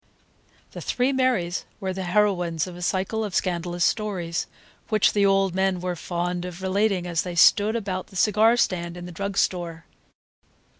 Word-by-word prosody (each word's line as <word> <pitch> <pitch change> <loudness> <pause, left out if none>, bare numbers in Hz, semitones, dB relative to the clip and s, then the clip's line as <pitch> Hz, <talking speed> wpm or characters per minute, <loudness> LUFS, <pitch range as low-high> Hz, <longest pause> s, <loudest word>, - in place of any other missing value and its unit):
The - - -8
three 255 +2 0
Marys 250 -10 0 0.2
were 190 -1 -3
the 190 0 -4
heroines 175 -4 +1
of 180 -2 -9
a 175 - -10
cycle 190 +5 -1
of 205 -4 -4
scandalous 175 -1 0
stories, 185 -6 -1 0.4
which 215 -3 +3
the 200 -1 +3
old 195 -2 +2
men 190 -1 +1
were 180 0 -3
fond 175 +1 -3
of 180 +1 -7
relating 195 -1 +1
as 170 -2 0
they 180 -1 -5
sat 205 +5 +5
about 195 -5 -3
the 195 - -17
cigar 215 +4 +4
stand 175 -5 -1
in 175 - -7
the 180 - -8
drug 200 +3 -4
store. 170 -3 -1
185 Hz, 170 wpm, -24 LUFS, 175-205 Hz, 0.4 s, sat